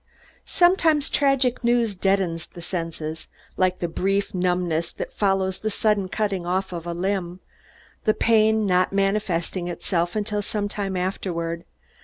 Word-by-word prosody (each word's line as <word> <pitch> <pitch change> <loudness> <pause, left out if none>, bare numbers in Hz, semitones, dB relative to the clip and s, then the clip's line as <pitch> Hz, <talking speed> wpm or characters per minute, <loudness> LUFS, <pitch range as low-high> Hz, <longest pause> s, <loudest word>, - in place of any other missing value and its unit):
Sometimes, 335 -5 +3
tragic 270 -3 +2
news 235 -2 +2
deadens 185 -3 0
the 175 - -11
senses, 165 -3 -4 0.3
like 185 -1 +2
the 175 - -2
brief 195 +4 0
numbness 180 -3 0
that - - -6
follows 195 -2 +1
the 215 - -1
sudden 205 -2 +1
cutting 200 -4 -1
off 185 +2 -1
of 170 0 -5
a - - -2
limb, 180 0 -2 0.7
the 215 - +3
pain 220 -1 +3
not 185 -1 +2
manifesting 195 -3 0
itself 175 0 -1
until 210 0 -1
some 205 0 -2
time 200 -2 -3
afterward. 170 -2 -3
190 Hz, 140 wpm, -24 LUFS, 175-210 Hz, 0.7 s, Sometimes